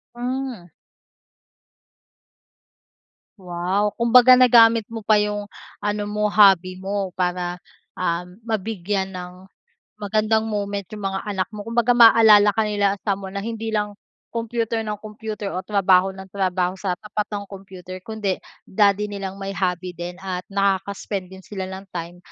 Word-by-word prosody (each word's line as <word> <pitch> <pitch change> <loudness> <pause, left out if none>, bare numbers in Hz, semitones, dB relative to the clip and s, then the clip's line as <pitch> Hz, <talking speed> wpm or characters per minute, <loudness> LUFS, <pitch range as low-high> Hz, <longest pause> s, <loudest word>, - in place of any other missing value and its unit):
Hmm. 250 -5 -4 2.7
Wow, 185 +3 -1
kumbaga 250 +2 +6
nagamit 230 -3 +6
mo 225 -2 -7
pa 215 - +4
yung 205 0 -2 0.3
ano 205 0 -2
mo, 210 0 -1
hobby 195 -3 +5
mo 195 -1 -3
para, 180 0 -2 0.3
um, 180 0 -2
mabigyan 205 -3 -2
ng 180 +1 -9 0.6
magandang 215 +2 +1
moment 200 -1 -2
yung 210 -2 -7
mga 195 0 -2
anak 195 -3 -1
mo. 210 - -6
Kumbaga 235 +2 +1
maaalala 225 -3 +7
ka 220 +2 +1
nila 205 -1 +1
someone 195 -1 -2
na 200 - -4
hindi 225 -1 -4
lang 210 -1 -1 0.4
computer 230 0 -2
ng 210 -1 -4
computer 210 -1 -6
o 185 - -2
trabaho 195 -2 +3
ng 190 0 -11
trabaho 185 -2 0
sa 185 -2 -3
tapat 210 0 -4
ng 205 -1 -4
computer, 185 -2 -10
kundi 210 -2 -3 0.2
daddy 205 0 +2
nilang 195 -2 -6
may 195 0 -5
hobby 180 -1 -2
din 175 +1 -7
at 185 -1 -4
nakaka-spend 195 -1 -1
din 190 0 -13
sila 190 -2 -5
ng 190 +1 -8
time 170 0 -6
200 Hz, 140 wpm, -22 LUFS, 185-215 Hz, 2.7 s, maaalala